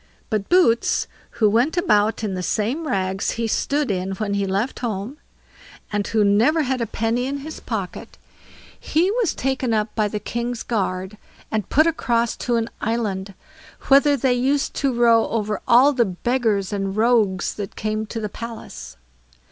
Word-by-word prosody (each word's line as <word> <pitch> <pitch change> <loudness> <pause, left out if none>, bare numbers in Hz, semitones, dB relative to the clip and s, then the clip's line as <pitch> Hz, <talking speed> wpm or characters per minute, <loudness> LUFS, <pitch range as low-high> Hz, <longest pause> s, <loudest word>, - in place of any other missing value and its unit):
But 210 -2 -1
Boots, 345 -11 +3 0.3
who 215 - +4
went 240 - +2
about 220 - +2
in 205 -3 -1
the 185 - -3
same 235 - -1
rags 190 -4 -1
he 230 - -1
stood 280 +3 0
in 190 0 -2
when 200 0 -3
he 200 -1 0
left 200 +7 -1
home, 230 +3 -4 0.8
and 205 -1 0
who 225 - -2
had 210 -1 +4
never 230 +11 +3
a 255 -4 -1
penny 230 +4 -1
in 280 +1 -2
his 315 - -7
pocket, - - -5 0.6
he 345 +5 +1
was 450 -6 0
taken 260 -3 -1
up 215 0 -1
by 215 -2 +1
the 210 +1 -4
king's 235 +2 -4
guard, 190 -2 -2 0.3
and 215 -3 -2
put 310 +3 +4
across 235 -8 0
to 240 - -1
an 230 -1 0
island, 205 -4 -2 0.5
whither 280 +1 +5
they 255 0 +2
used 270 +3 0
to 275 - +1
row 235 -2 +4
over 210 -2 -2
all 260 +4 +6
the 250 -3 +3
beggars 210 0 -1
and 195 0 -2
rogues 215 -5 +2
that 200 -2 -6
came 215 0 -2
to 225 - -5
the 215 - -3
palace. 230 - -9
225 Hz, 170 wpm, -22 LUFS, 205-255 Hz, 0.8 s, all